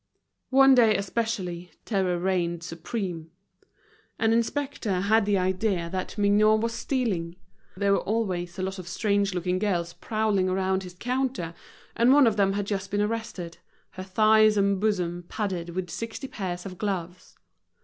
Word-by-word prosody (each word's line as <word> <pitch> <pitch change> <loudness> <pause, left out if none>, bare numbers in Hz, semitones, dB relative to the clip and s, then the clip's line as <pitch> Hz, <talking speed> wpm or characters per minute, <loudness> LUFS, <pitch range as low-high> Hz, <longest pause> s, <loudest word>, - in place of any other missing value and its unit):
One 270 0 +6
day 230 -5 +5
especially 195 -4 -3 0.2
terror 190 -5 0
reigned 175 -2 -1
supreme. 170 -1 -5 0.9
An 225 0 +2
inspector 235 -5 -1
had 210 +1 +3
the 205 -1 +3
idea 185 -2 0
that 185 +2 -4
Mignot 210 +1 +4
was 230 0 -1
stealing. 215 -10 -2 0.4
There 200 +1 +2
were 200 - +4
always 185 -5 -2
a 185 - -2
lot 190 0 -3
of 180 - -8
strange 200 +1 0
looking 180 +1 -1
girls 175 -4 -1
prowling 215 -4 0
around 190 0 0
his 180 -1 -10
counter; 250 -7 -2 0.4
and 235 +2 +4
one 285 0 +7
of 225 -3 +3
them 195 -2 +2
had 205 0 -2
just 200 -1 -3
been 205 - -1
arrested, 210 -6 -4 0.3
her 185 - -8
thighs 215 +2 +4
and 200 -1 +2
bosom 180 -5 -1
padded 185 -5 -3
with 180 -2 -3
sixty 230 +4 -5
pairs 180 -6 -5
of 185 -2 -8
gloves. 180 -3 -4
195 Hz, 155 wpm, -26 LUFS, 180-220 Hz, 0.9 s, one